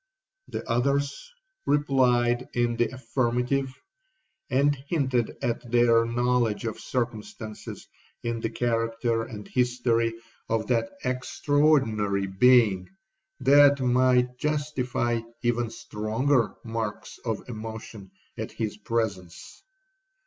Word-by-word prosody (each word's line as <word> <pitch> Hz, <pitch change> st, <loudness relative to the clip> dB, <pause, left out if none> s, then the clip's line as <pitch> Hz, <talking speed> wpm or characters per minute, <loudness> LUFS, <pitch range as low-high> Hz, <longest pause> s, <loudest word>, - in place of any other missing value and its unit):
The -, -, -6 dB
others 140 Hz, -, 0 dB, 0.4 s
replied 125 Hz, -4 st, +2 dB
in 120 Hz, -1 st, +1 dB
the 120 Hz, -1 st, +1 dB
affirmative, 130 Hz, +1 st, -1 dB, 0.8 s
and 140 Hz, +2 st, +3 dB
hinted 130 Hz, -4 st, -1 dB
at 120 Hz, 0 st, -2 dB
their 115 Hz, -1 st, +4 dB
knowledge 120 Hz, -2 st, +1 dB
of 110 Hz, -, -4 dB
circumstances 110 Hz, -3 st, -5 dB, 0.4 s
in 115 Hz, -1 st, -2 dB
the 115 Hz, -, -2 dB
character 115 Hz, 0 st, 0 dB
and 105 Hz, -2 st, -7 dB
history 120 Hz, -2 st, +1 dB, 0.3 s
of 110 Hz, -1 st, 0 dB
that 115 Hz, -2 st, +1 dB
extraordinary 130 Hz, -6 st, +1 dB
being 100 Hz, -1 st, +4 dB, 0.5 s
that 140 Hz, 0 st, +6 dB
might 125 Hz, 0 st, +2 dB
justify 130 Hz, -6 st, -1 dB, 0.2 s
even 120 Hz, -1 st, +1 dB
stronger 115 Hz, +4 st, 0 dB
marks 115 Hz, -2 st, -5 dB
of 110 Hz, -3 st, -3 dB
emotion 110 Hz, -3 st, -8 dB, 0.3 s
at 110 Hz, -, -4 dB
his 110 Hz, -2 st, -4 dB
presence. 100 Hz, -5 st, -4 dB
120 Hz, 100 wpm, -26 LUFS, 115-130 Hz, 0.8 s, that